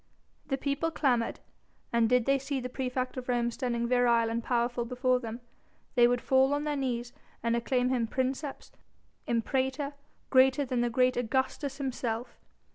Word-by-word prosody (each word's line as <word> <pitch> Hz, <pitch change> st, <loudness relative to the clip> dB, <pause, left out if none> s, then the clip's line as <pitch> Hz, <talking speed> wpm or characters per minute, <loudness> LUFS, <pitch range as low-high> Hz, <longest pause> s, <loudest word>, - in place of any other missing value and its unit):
The 270 Hz, -, 0 dB
people 280 Hz, +4 st, -1 dB
clamoured, 250 Hz, -7 st, 0 dB, 0.5 s
and 230 Hz, -1 st, +3 dB
did 250 Hz, -2 st, +3 dB
they 275 Hz, 0 st, +3 dB
see 270 Hz, 0 st, -3 dB
the 250 Hz, 0 st, -5 dB
praefect 255 Hz, 0 st, -3 dB
of 255 Hz, 0 st, -6 dB
Rome 240 Hz, -1 st, +1 dB
standing 235 Hz, -2 st, -2 dB
virile 235 Hz, -2 st, +3 dB
and 230 Hz, 0 st, -2 dB
powerful 240 Hz, 0 st, 0 dB
before 250 Hz, +1 st, +1 dB
them, 230 Hz, 0 st, -6 dB, 0.5 s
they 240 Hz, -1 st, +6 dB
would 245 Hz, 0 st, +1 dB
fall 265 Hz, +1 st, +3 dB
on 290 Hz, -, -2 dB
their 300 Hz, -1 st, -1 dB
knees 245 Hz, -3 st, -2 dB, 0.3 s
and 230 Hz, 0 st, +2 dB
acclaim 250 Hz, +1 st, +1 dB
him 245 Hz, -3 st, +1 dB
princeps, 265 Hz, +4 st, -3 dB, 0.6 s
imperator, 265 Hz, +4 st, 0 dB, 0.4 s
greater 265 Hz, +2 st, +5 dB
than 240 Hz, -1 st, 0 dB
great 255 Hz, +2 st, +2 dB
Augustus 260 Hz, +3 st, -1 dB
himself. 245 Hz, -3 st, -3 dB
250 Hz, 155 wpm, -29 LUFS, 235-265 Hz, 0.6 s, they